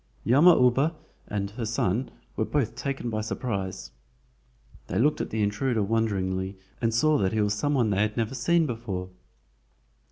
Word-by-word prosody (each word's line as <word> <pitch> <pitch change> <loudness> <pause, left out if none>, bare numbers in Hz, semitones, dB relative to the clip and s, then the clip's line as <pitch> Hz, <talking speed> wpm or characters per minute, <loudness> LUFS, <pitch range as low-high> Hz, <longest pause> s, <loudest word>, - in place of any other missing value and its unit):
Yama 155 +9 +6
uba 135 +6 +3 0.3
and 100 -1 -3
her 115 +3 -5
son 115 +2 0 0.3
were - - 0
both 120 -2 0
taken 125 -2 -3
by 110 0 -1
surprise. 100 -4 -4 1.0
They 90 - -2
looked 145 +7 +2
at - - -4
the 110 -1 -1
intruder 110 +2 0
wonderingly 95 -3 -1 0.2
and 115 -1 +2
saw 150 +7 +3
that 95 0 +1
he 110 - +1
was 105 -1 +1
some 145 +7 0
one 120 -5 +2
they 100 0 +1
had 105 +1 0
never 115 +1 -1
seen 165 +7 +2
before. 105 -8 -4
115 Hz, 165 wpm, -27 LUFS, 100-130 Hz, 1.0 s, Yama